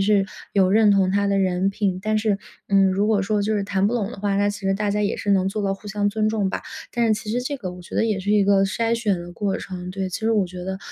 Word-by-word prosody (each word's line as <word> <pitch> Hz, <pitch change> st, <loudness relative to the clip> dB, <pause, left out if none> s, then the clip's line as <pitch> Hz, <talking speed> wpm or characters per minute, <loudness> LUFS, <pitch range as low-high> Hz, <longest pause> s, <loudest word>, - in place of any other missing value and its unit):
是 200 Hz, 0 st, +3 dB, 0.3 s
有 190 Hz, -2 st, +4 dB
认 215 Hz, 0 st, +5 dB
同 195 Hz, -2 st, +3 dB
他 200 Hz, +1 st, +1 dB
的 200 Hz, 0 st, +1 dB
人 185 Hz, 0 st, +1 dB
品。 195 Hz, -2 st, -1 dB
但 215 Hz, +1 st, 0 dB
是， 215 Hz, -2 st, +1 dB, 0.3 s
嗯， 195 Hz, -1 st, +5 dB
如 200 Hz, +3 st, +1 dB
果 215 Hz, -2 st, +2 dB
说 205 Hz, +1 st, 0 dB
就 215 Hz, +1 st, 0 dB
是 205 Hz, -, 0 dB
谈 195 Hz, 0 st, 0 dB
不 225 Hz, -, 0 dB
拢 220 Hz, -3 st, -1 dB
的 220 Hz, -, -9 dB
话， 200 Hz, -1 st, 0 dB
那 205 Hz, 0 st, +2 dB
其 205 Hz, -, -4 dB
实 195 Hz, 0 st, 0 dB
大 205 Hz, +1 st, 0 dB
家 210 Hz, +1 st, 0 dB
也 200 Hz, -, 0 dB
是 205 Hz, -, -2 dB
能 190 Hz, -1 st, +2 dB
做 210 Hz, +1 st, -3 dB
到 195 Hz, 0 st, 0 dB
互 205 Hz, -, -14 dB
相 205 Hz, 0 st, 0 dB
尊 215 Hz, +1 st, 0 dB
重 205 Hz, -3 st, 0 dB
吧， -, -, -4 dB, 0.3 s
但 235 Hz, -1 st, +1 dB
是 220 Hz, -, +3 dB
其 210 Hz, -, -6 dB
实 245 Hz, +2 st, -1 dB
这 280 Hz, +1 st, -3 dB
个 185 Hz, -6 st, -5 dB
我 180 Hz, 0 st, -11 dB
觉 -, -, -11 dB
得 225 Hz, -, +2 dB
也 210 Hz, -3 st, 0 dB
是 205 Hz, +2 st, -2 dB
一 210 Hz, -2 st, +4 dB
个 195 Hz, -1 st, +4 dB
筛 230 Hz, +4 st, 0 dB
选 210 Hz, -6 st, 0 dB
的 175 Hz, 0 st, -9 dB
过 200 Hz, +1 st, -2 dB
程， 180 Hz, -1 st, -7 dB
对。 190 Hz, 0 st, -3 dB
其 185 Hz, -, -5 dB
实 225 Hz, +1 st, +1 dB
我 205 Hz, -4 st, +2 dB
觉 180 Hz, 0 st, -8 dB
得， 190 Hz, 0 st, -4 dB
200 Hz, 330 characters per minute, -23 LUFS, 195-215 Hz, 0.3 s, 认